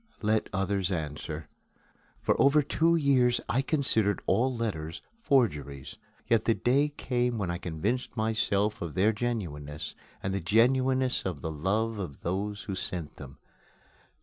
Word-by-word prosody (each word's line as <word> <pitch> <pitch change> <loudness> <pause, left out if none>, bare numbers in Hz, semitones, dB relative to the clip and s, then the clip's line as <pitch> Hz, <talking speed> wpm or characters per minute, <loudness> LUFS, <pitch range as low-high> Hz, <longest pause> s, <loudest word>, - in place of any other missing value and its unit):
Let 110 +1 +1
others 95 -1 0
answer. 75 -2 -4 0.8
For - - +3
over 145 +2 +5
two 165 +4 +2
years 130 -6 +3
I 130 - +2
considered 115 -9 +2
all 120 +7 +2
letters 80 -9 -3 0.2
forgeries. 75 - 0 0.3
Yet 115 -2 +2
the 115 - +3
day 140 +4 +2
came 125 -4 -1
when 95 -5 -1
I 85 - -3
convinced 100 +11 -2
myself 110 -1 +1
of 85 -3 -5
their 100 +4 +3
genuineness 80 -11 -4 0.3
and 95 - -1
the 100 - -1
genuineness 130 +6 +3
of 90 -7 -4
the 80 - -3
love 105 +8 -1
of 80 -8 -6
those 100 +4 -2
who 100 - -4
sent 90 -4 -4
them. 70 -2 -10
105 Hz, 145 wpm, -29 LUFS, 85-125 Hz, 0.8 s, over